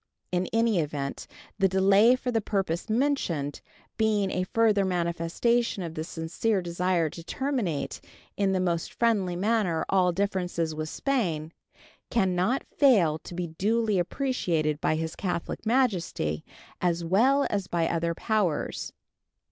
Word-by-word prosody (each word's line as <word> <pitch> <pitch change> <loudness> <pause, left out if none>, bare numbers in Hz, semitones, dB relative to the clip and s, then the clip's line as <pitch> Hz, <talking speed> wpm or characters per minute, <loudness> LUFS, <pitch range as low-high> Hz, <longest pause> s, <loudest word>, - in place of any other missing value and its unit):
In 180 0 0
any 225 -4 +2
event, 145 -3 -3 0.3
the 195 - +5
delay 195 +5 +5
for 255 -1 -3
the 225 -2 +1
purpose 195 -2 -2
mentioned, 215 - 0 0.4
being 210 -3 +2
a 185 - -1
further 215 -1 +3
manifestation 180 +5 0
of 165 -2 -5
the 155 - -4
sincere 170 +7 -1
desire 175 -1 0
to 170 - -9
terminate 230 - -2 0.3
in 200 -1 +1
the 190 - +1
most 170 -2 -1
friendly 205 -7 +1
manner 200 -3 +1
all 185 -2 +3
differences 180 -3 -1
with 155 0 -4
Spain, 170 - -1 0.6
can 190 -6 +2
not 205 +10 +1
fail 190 - +3
to 175 - -10
be 180 0 -2
duly 210 +5 0
appreciated 170 - -1
by - - +2
His 160 0 -3
Catholic 180 +3 -3
Majesty 185 - 0 0.4
as 175 -1 +1
well 255 +11 +3
as 200 -3 -1
by 170 -2 0
other 170 0 -1
powers. 205 -9 -1
185 Hz, 140 wpm, -27 LUFS, 165-220 Hz, 0.6 s, the